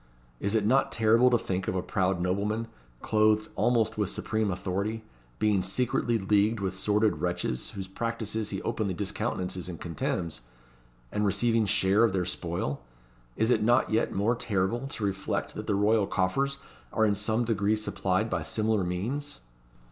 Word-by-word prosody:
Is 100 +3 0
it 105 -2 +2
not 130 +5 +3
terrible 115 +3 +4
to 120 - +4
think 95 -4 -3
of - - -1
a 90 - -1
proud 95 -1 0
nobleman, 100 +5 -1 0.4
clothed 110 0 +3
almost 115 -2 +1
with 105 -3 +1
supreme 110 0 -1
authority, 100 +4 -2 0.3
being 105 -3 +2
secretly 120 +4 0
leagued 105 +2 +2
with 95 -1 -2
sordid 105 +3 +1
wretches, 90 -8 -2
whose 95 -1 -5
practices 110 +1 -3
he 95 - -4
openly 100 -5 -1
discountenances 95 -3 -3
and 85 - -7
contemns, 85 -3 -3 0.7
and 105 - -1
receiving 115 +2 +2
share 95 +3 +3
of 115 - +3
their 90 -2 0
spoil? 85 -5 -3 0.5
Is 110 +2 +2
it 110 - +3
not 120 +3 +3
yet 110 +1 +1
more 105 +5 +1
terrible 115 +3 -1
to 115 - -6
reflect 95 -1 -2
that - - -6
the 100 - +1
royal 105 0 +3
coffers 135 +10 0 0.3
are 110 - +2
in 105 - +3
some 110 +3 0
degree 105 -2 +1
supplied 105 -1 -1
by - - -1
similar 110 -2 0
means?" 115 - -3
105 Hz, 165 wpm, -28 LUFS, 95-110 Hz, 0.7 s, terrible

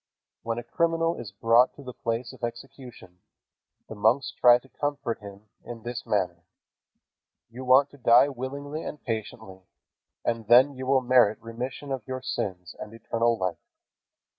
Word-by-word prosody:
When 115 0 -3
a 120 - -4
criminal 165 +6 0
is 115 -5 -7
brought 115 +5 +3
to 140 - -12
the 125 -1 -8
place 115 +1 -3
of - - -16
execution, 120 -6 -8 0.7
the - - -8
monks 115 +6 +2
try 120 -1 +7
to 125 - -17
comfort 140 -4 -3
him 100 0 -12
in 115 -2 -9
this 120 -1 -6
manner: 90 -4 -1 1.1
"You 125 +3 -8
want 130 +3 +5
to 140 - -15
die 120 +3 +6
willingly 140 +3 -6
and 150 - -6
patiently, 110 -4 -6 0.7
and 115 -2 -2
then 125 +5 +6
you 130 0 -6
will 135 0 +4
merit 125 -4 +4
remission 125 +5 -6
of 135 -2 -2
your 130 0 -5
sins 90 -7 -4
and 105 +1 -8
eternal 115 +1 0
life." 90 -3 -3
120 Hz, 160 wpm, -26 LUFS, 110-130 Hz, 1.1 s, try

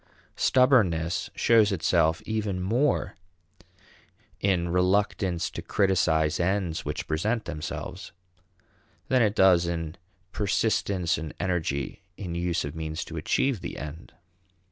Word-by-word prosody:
Stubbornness 95 -11 +3
shows 110 -3 +4
itself 80 -2 +1
even 105 -4 -2
more 120 +10 0 1.2
in 90 -3 +1
reluctance 90 0 +1
to - - -6
criticize 80 -6 +1
ends 90 -2 0
which - - -4
present 110 +9 -1
themselves 90 +4 -6 1.0
than 130 -1 +4
it 105 -2 +2
does 90 -4 +5
in 80 -1 -4 0.3
persistence 95 -5 0
and 80 -1 -7
energy 80 -7 -2 0.2
in 90 -5 -5
use 85 -1 -1
of 70 +2 -6
means 80 0 -4
to 80 - -9
achieve 105 - 0
the - - -6
end. 75 +3 -8
90 Hz, 115 wpm, -27 LUFS, 80-100 Hz, 1.2 s, does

